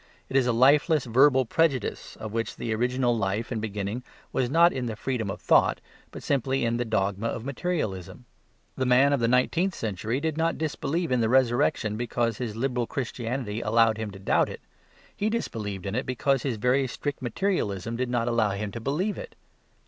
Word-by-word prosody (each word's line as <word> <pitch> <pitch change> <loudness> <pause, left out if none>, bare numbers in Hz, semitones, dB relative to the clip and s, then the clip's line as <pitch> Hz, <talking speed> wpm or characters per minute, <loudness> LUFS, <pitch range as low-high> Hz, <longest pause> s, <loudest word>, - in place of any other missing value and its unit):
It - - -6
is 130 -2 +4
a - - +3
lifeless 140 +5 +4
verbal 130 +2 +4
prejudice 135 -2 0
of 110 - -7
which 115 0 -2
the 115 - -3
original 125 +1 +1
life 105 +2 -2
and 110 -3 -2
beginning 105 +2 -3 0.3
was 125 -2 +1
not 170 +5 +5
in 125 -2 -3
the 110 - -3
freedom 115 -2 -2
of - - -5
thought, - - +3 0.3
but - - -10
simply 135 -2 0
in 115 0 0
the 120 - 0
dogma 100 -1 0
of 115 0 -4
materialism. 125 - -3 0.5
The 130 - -1
man 135 +3 +5
of 140 - +2
the 115 - +2
nineteenth 165 +10 +2
century 110 +3 -2
did 160 0 -2
not 165 +1 +1
disbelieve 160 +1 -2
in 125 -2 +2
the 110 - +2
Resurrection 120 -4 +2
because 115 -1 -1
his 115 -4 -3
liberal 125 0 -1
Christianity 120 -3 -3
allowed 115 0 +3
him 110 -1 -3
to 100 - -10
doubt 95 - +2
it. - - -8 0.5
He 210 - 0
disbelieved 105 - -3
in 100 - -3
it 125 +4 -2
because 135 +1 +1
his 125 -4 -2
very 125 +5 +2
strict 145 +3 -4
materialism 115 - -1
did 125 +1 -2
not 120 -1 0
allow 115 -3 +2
him 100 +1 -4
to 115 - -6
believe 160 - -1
it. 475 -2 -9
120 Hz, 195 wpm, -26 LUFS, 110-135 Hz, 0.5 s, not